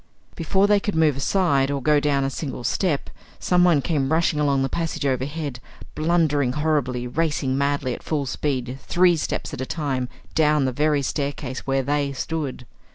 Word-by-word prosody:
Before 190 +4 +2
they 205 0 +4
could 205 -1 -3
move 155 -3 +3
aside, 140 -2 +2
or 140 -1 -1
go 150 +2 +3
down 145 -1 +1
a 135 - -1
single 135 -4 -5
step, 145 - -1 0.3
someone 175 -5 +3
came 145 -5 0
rushing 160 -2 +2
along 140 -2 +2
the - - +1
passage 165 0 -3
overhead, 140 +1 -2 0.3
blundering 155 -5 +1
horribly, 140 -5 0
racing 145 0 -1
madly, 140 -2 0
at - - -7
full 150 -3 -2
speed, 130 -2 -3
three 180 -1 +3
steps 155 - -3
at - - -5
a - - -2
time, 135 -6 -2 0.2
down 150 -3 +3
the 130 - 0
very 150 +2 +1
staircase 140 -2 -3
where 135 0 +1
they 140 0 0
stood. 140 -2 -4
145 Hz, 170 wpm, -23 LUFS, 135-160 Hz, 0.3 s, they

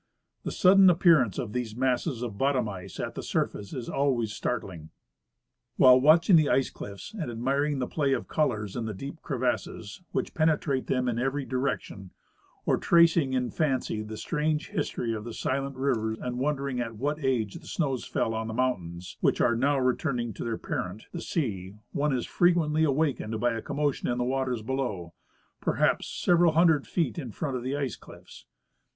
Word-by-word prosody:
TKe - - -1
sudden 190 0 +6
appearance 165 - +4
of 110 -4 -4
these 120 -3 -3
masses 125 0 0
of 115 -4 -4
bottom 135 -4 +2
ice 95 -3 -8
at - - -3
the - - -5
surface 100 -1 -2
is 125 -3 -5
always 125 -6 0
startling. 90 -9 -4 0.9
While 130 0 +7
watching 165 +5 +6
the 155 -2 +3
ice 135 - +2
cliffe 100 - -9
and 175 - -4
admiring 135 +5 0
the 130 - -1
play 140 0 0
of - - -2
colors 105 -10 -1
in 120 - -2
the 110 -2 -4
deep 140 - -8
crevasses 125 - -3
which - - -2
penetrate 155 -4 +1
them 125 -1 0
in 120 -1 0
every 135 +2 -1
direction, 125 -7 -3 0.6
or - - +3
tracing 170 -5 +4
in 125 -2 0
fancy 135 -8 -1
the 110 0 -7
strange 155 +1 -1
history 115 -1 -2
of 110 -1 -4
the 115 0 -7
silent 135 +1 -2
river 125 -5 0
and 125 0 -4
won 150 +3 +1
dering 135 -2 -3
in 115 -2 -4
what 145 +5 -2
age 120 -6 0
the - - -15
snows 135 -7 -1
fell 115 - -1
on 110 0 -3
the 110 - -5
mountains, 90 -9 -2
which - - +2
are 120 - +3
now 140 +4 +2
returning 125 -2 0
to - - -6
their 115 -1 -2
parent, 95 +4 -4
the 170 - -5
sea, 100 - -3 0.2
one 145 +1 0
is 125 -2 -1
frequently 165 -3 +2
awakened 140 -7 0
by 120 0 +1
a 115 - -4
commotion 145 +1 -1
in 120 - 0
the 125 - 0
waters 130 -2 -1
below, 110 -9 -3 0.5
perhaj^s - - +1
several 175 -2 +3
hundred 160 -3 +4
feet 165 -3 -1
in 130 -7 -5
front 135 +3 -3
of 125 - -3
the 130 +3 -2
ice 135 -5 -2
cliffs. - - -15
130 Hz, 185 wpm, -28 LUFS, 115-145 Hz, 0.9 s, While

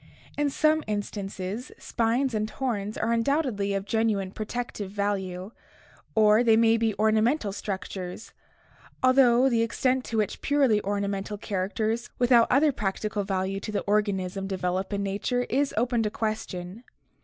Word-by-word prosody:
In 290 0 +1
some 310 +2 +2
instances 205 +1 -4
spines 240 +3 0
and 215 0 -1
horns 215 -5 -3
are 230 - 0
undoubtedly 230 -5 0
of 195 0 -2
genuine 215 -4 0
protective 215 -1 -5
value, 195 -1 -3 0.6
or 215 +1 +5
they 225 -2 +5
may 225 0 +5
be 225 -3 0
ornamental 220 +3 +2
structures, 190 -1 -6 0.7
although 255 -1 +5
the 235 -3 +2
extent 255 +3 +1
to 230 - -3
which 210 -2 -1
purely 270 -7 +3
ornamental 200 0 -2
characters 215 +4 -2
without 240 -1 +5
other 290 +3 +4
practical 210 -2 -2
value 195 0 -2
to 215 - -6
the 205 - -1
organism 195 -2 -1
develop 190 0 -2
in 200 0 -1
nature 205 +6 -1
is 280 +2 +1
open 240 0 +1
to 215 - 0
question. 215 -2 -4
215 Hz, 140 wpm, -26 LUFS, 200-240 Hz, 0.7 s, or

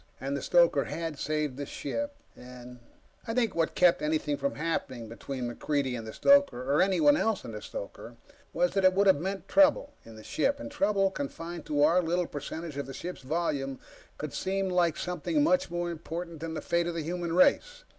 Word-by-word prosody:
And 135 +2 -3
the 140 - -3
stoker 170 -4 +4
had 165 -3 -5
saved 150 -3 -2
the 145 - -4
ship, 285 - -4 0.2
and... 125 0 -12 0.5
I 225 - -2
think 230 -5 +1
what 165 -1 0
kept 180 -1 +4
anything 150 -1 0
from 140 0 -2
happening 130 -7 -3
between 125 +2 -5
MacReidie 130 +1 -1
and 115 -2 -6
the - - -5
stoker, 210 - +3
or 150 - +4
anyone 285 +11 +4
else 225 -8 0
and - - -7
the - - -6
stoker, - - -8 0.4
was 265 0 +1
that 195 - 0
it 185 0 +6
would 200 +2 +3
have 190 -7 +4
meant 195 +2 -4
trouble 290 0 +4
in 115 - -13
the 110 - -12
ship. 280 - 0
Trouble, 200 -7 +2
confined 165 +1 -6
to 145 -1 +2
our 170 +4 +5
little 175 +1 0
percentage 150 +1 -6
of 140 -2 -4
the 135 - -8
ship's 180 +5 -6
volume, 135 -2 -2 0.4
could 150 -1 -5
seem 195 0 -1
like 175 -3 +2
something 180 - -1
much 275 - +2
more 175 0 -2
important 170 0 -6
than 160 +1 -5
the - - -4
fate 170 0 0
of 170 - -3
the 165 - -2
human 170 +1 -3
race. - - +3
165 Hz, 200 wpm, -29 LUFS, 140-190 Hz, 0.5 s, it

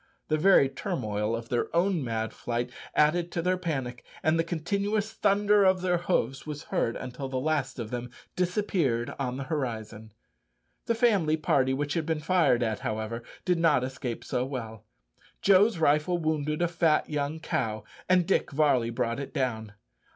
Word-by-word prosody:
The 155 - +2
very 180 -5 +6
turmoil 110 - -2
of 115 0 -7
their 120 - 0
own 175 -2 +2
mad 110 -2 -2
flight 120 +1 -3 0.2
added 170 +3 +3
to 170 - -1
their 185 +1 +2
panic, 135 -9 -4 0.2
and 155 +2 +2
the - - +3
continuous 200 +6 -1
thunder 205 0 +3
of 185 -1 +3
their 180 -1 +1
hoofs 135 -7 -1
was 150 -1 -5
heard 115 - -1
until 130 +1 -6
the 130 -1 -2
last 145 -2 -1
of 115 -3 -5
them 125 0 -4 0.3
disappeared 180 - 0
on 130 -2 -2
the 135 - -4
horizon. 115 -7 -4 0.8
The 230 - +2
family 200 -10 +3
party 140 -5 +2
which 145 +1 -2
had 165 -2 -2
been 160 -1 0
fired 150 -7 +3
at, 110 -2 -1
however, 110 +2 -3 0.2
did 180 -2 +2
not 155 -6 +3
escape 130 -2 -4
so 125 -2 -1
well, 115 -5 -6 0.6
Joe's 200 +2 +5
rifle 155 +3 +2
wounded 155 -1 -1
a - - +3
fat 165 -2 +2
young 150 +1 -2
cow, 110 -9 -2 0.3
and 180 -1 +4
Dick 195 - +1
Varley 135 -5 +2
brought 115 +1 -2
it 140 +2 -7
down. 110 -6 -2
150 Hz, 170 wpm, -28 LUFS, 125-175 Hz, 0.8 s, very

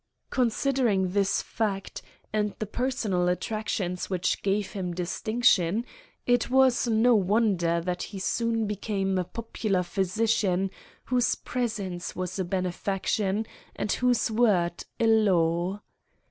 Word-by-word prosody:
Considering 240 -5 +1
this 200 0 +1
fact, 200 -4 -3 0.3
and 210 -1 0
the 215 - -3
personal 215 -6 -1
attractions 185 -1 -2
which 185 -2 0
gave 200 0 0
him 180 -3 -4
distinction, 205 +2 +1 0.4
it 245 +1 +2
was 260 -1 +4
no 230 +2 +4
wonder 195 -5 +2
that 180 +1 -3
he 200 - -6
soon 225 +3 0
became 195 -2 -1
a - - +1
popular 215 -2 -2
physician 195 0 0 0.3
whose 250 -1 +2
presence 205 -8 -3
was 185 +1 -4
a - - +1
benefaction 190 +3 -1 0.3
and 205 - -2
whose 245 -2 +2
word 195 -7 +2
a 230 - +2
law. 185 -4 +2
200 Hz, 120 wpm, -27 LUFS, 185-225 Hz, 0.4 s, was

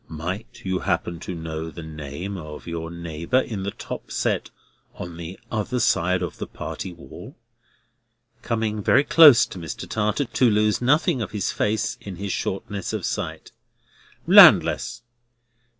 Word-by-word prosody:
"Might 95 +10 -6
you 95 -1 -1
happen 85 -2 -2
to 90 - -6
know 80 0 -5
the 85 0 -9
name 80 +5 -6
of 75 -4 -9
your 85 -1 -5
neighbour 85 +7 -1
in 110 -6 -4
the 100 - -2
top - - -8
set - - -1 0.5
on 85 -1 -7
the 85 +2 -8
other 120 +3 -2
side 90 -4 +2
of 90 - -6
the - - -4
party 95 - -6
wall?" 85 - -12 1.0
coming 110 -2 -2
very 130 +7 +4
close 145 -4 +8
to 95 - -10
Mr. 80 -3 -6
Tartar, 105 +6 0
to 120 +1 +2
lose 105 +1 +2
nothing 135 0 +2
of 110 - -3
his 105 -3 -1
face, 115 +4 -1
in 100 -2 -8
his 100 +2 -4
shortness 95 +1 -4
of - - -3
sight. - - -4 0.7
"Landless." - - +6
95 Hz, 150 wpm, -23 LUFS, 85-110 Hz, 1.0 s, close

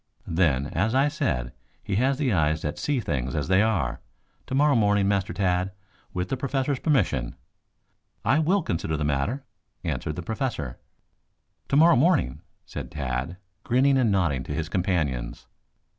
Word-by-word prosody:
Then, 80 -6 +2
as 110 +8 0
I 140 +2 +4
said, 60 - -2 0.3
he 100 - -1
has 130 +3 +2
the 135 -6 +1
eyes 80 -2 +1
that 75 - -3
see 145 -3 0
things 65 - -2
as 75 -2 -1
they 95 +1 +5
are. 110 -8 0 0.5
Tomorrow 145 +3 +3
morning, 105 -4 +3
Master 100 +1 +1
Tad, 90 -1 0 0.4
with 90 0 -3
the 135 - -1
Professor's 135 +1 -1
permission 90 - +1 0.4
" - - -40
"I - - +3
will 180 +4 +2
consider 80 - -2
the 75 - -2
matter," 75 - -1 0.4
answered 75 - -2
the 90 - -5
Professor. 110 - -3 0.9
"Tomorrow 155 +1 +6
morning," 135 - +2 0.2
said - - -7
Tad, 65 +4 -3 0.3
grinning 135 +3 +3
and 125 -5 +3
nodding 85 -9 +1
to 75 - -4
his 80 +2 -3
companions. 75 -11 -1
95 Hz, 155 wpm, -26 LUFS, -, 0.9 s, Tomorrow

